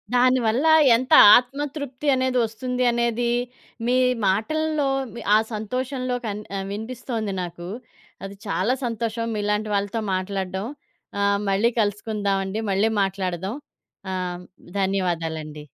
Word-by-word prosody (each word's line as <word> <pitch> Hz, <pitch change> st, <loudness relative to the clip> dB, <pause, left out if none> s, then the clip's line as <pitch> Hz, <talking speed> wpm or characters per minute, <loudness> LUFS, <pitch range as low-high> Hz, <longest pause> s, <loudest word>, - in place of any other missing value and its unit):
దాని 255 Hz, +1 st, +4 dB
వల్ల 235 Hz, +7 st, +1 dB, 0.3 s
ఎంత 255 Hz, +2 st, 0 dB, 0.2 s
ఆత్మ 250 Hz, +3 st, -3 dB, 0.2 s
తృప్తి 285 Hz, -1 st, -5 dB
అనేది 255 Hz, -1 st, 0 dB
ఒస్తుంది 250 Hz, +3 st, -3 dB
అనేది 235 Hz, 0 st, 0 dB, 0.6 s
మీ 250 Hz, -, +3 dB, 0.3 s
మాటల్లో, 300 Hz, +9 st, 0 dB, 0.5 s
ఆ -, -, +7 dB, 0.2 s
సంతోషంలో 255 Hz, +4 st, -3 dB
కన్ 210 Hz, -1 st, -3 dB, 0.2 s
ఆ -, -, -2 dB
వినిపిస్తొంది 220 Hz, -1 st, -4 dB
నాకు. 175 Hz, 0 st, -7 dB, 0.6 s
అది 195 Hz, +1 st, -8 dB
చాలా 200 Hz, +5 st, +1 dB
సంతోషం. 230 Hz, 0 st, -2 dB
మీలాంటి 210 Hz, +1 st, -1 dB
వాళ్ళతో 205 Hz, +3 st, -1 dB
మాట్లాడడం. 190 Hz, 0 st, -3 dB, 0.5 s
ఆహ్, 200 Hz, 0 st, +2 dB
మళ్ళీ 210 Hz, +5 st, +2 dB
కలుసుకుందాం 205 Hz, -1 st, -1 dB
అండి. 210 Hz, +4 st, -3 dB
మళ్ళీ 200 Hz, +3 st, +2 dB
మాట్లాడదాం. 190 Hz, +1 st, -2 dB, 0.6 s
ఆహ్, 180 Hz, -1 st, -4 dB, 0.4 s
ధన్యవాదాలండి. 165 Hz, -6 st, -2 dB
215 Hz, 115 wpm, -23 LUFS, 195-250 Hz, 0.6 s, ఆ